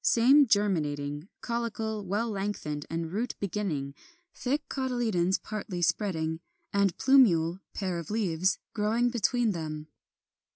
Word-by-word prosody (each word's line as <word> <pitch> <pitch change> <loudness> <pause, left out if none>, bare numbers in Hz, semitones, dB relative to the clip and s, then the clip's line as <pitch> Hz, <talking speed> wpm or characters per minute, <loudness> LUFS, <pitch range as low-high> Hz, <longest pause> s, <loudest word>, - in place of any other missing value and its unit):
Same 270 +5 +6
germinating: 150 -6 0
caulicle 225 -2 -2
well 205 +5 -1
lengthened 195 -8 -3
and 165 0 -3
root 230 +5 -2
beginning; 175 -9 -2 0.4
thick 285 +4 -2
cotyledons 230 -9 0
partly 200 -4 -5
spreading; 160 -5 0 0.3
and 200 -2 +2
plumule 185 -11 +4 0.2
(pair 185 -4 -2
of 170 - -8
leaves) 190 -4 +1 0.2
growing 225 +3 +1
between 240 0 +1
them. 155 -3 -5
200 Hz, 115 wpm, -29 LUFS, 165-230 Hz, 0.4 s, Same